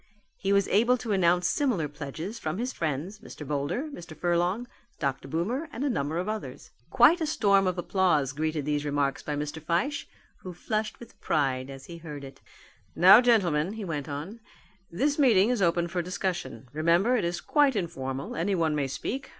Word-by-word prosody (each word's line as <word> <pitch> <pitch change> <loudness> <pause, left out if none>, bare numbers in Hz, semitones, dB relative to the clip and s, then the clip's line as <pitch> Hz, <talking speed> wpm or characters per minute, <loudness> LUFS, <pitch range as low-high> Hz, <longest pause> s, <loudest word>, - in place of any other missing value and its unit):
He 195 - -2
was 200 -1 +3
able 235 +5 +4
to 230 -2 -5
announce 180 -2 +3
similar 240 - 0
pledges 155 - -7
from 155 +3 -3
his 250 +4 -3
friends, 165 +6 -3
Mr. 150 - -10
Boulder, 145 - -1
Mr. 175 - -9
Furlong, 175 +7 0 0.3
Dr. 135 -3 -2
Boomer, 235 - -2
and 250 - -4
a 285 - +1
number 150 -5 -2
of 180 +3 -2
others. 215 0 -6 0.2
Quite 345 +1 +5
a 320 - 0
storm 200 -9 +3
of 185 0 -1
applause 175 -7 +1
greeted 155 -1 -2
these 150 -1 0
remarks 145 -1 -1
by 150 - -3
Mr. 150 +2 -4
Fyshe, 245 - -1 0.3
who 180 -2 -9
flushed 215 +3 -3
with 235 - -14
pride 135 -4 0
as 135 -1 -9
he 170 - -9
heard 150 -4 -8
it. 135 0 -11 0.5
"Now, 190 +6 +8
gentlemen," 190 -8 +2
he 220 -2 -6
went 150 -4 -4
on, 155 +11 -6 0.5
"this 285 - 0
meeting 230 -5 +5
is 245 -5 0
open 170 -1 +2
for 175 +1 -2
discussion. 175 -9 -4
Remember 170 +10 +3
it 230 - 0
is 170 0 -1
quite 290 -4 +2
informal, 135 -8 -4
anyone 165 -2 0
may 145 -2 0
speak. 255 - -4
175 Hz, 185 wpm, -27 LUFS, 150-215 Hz, 0.5 s, Now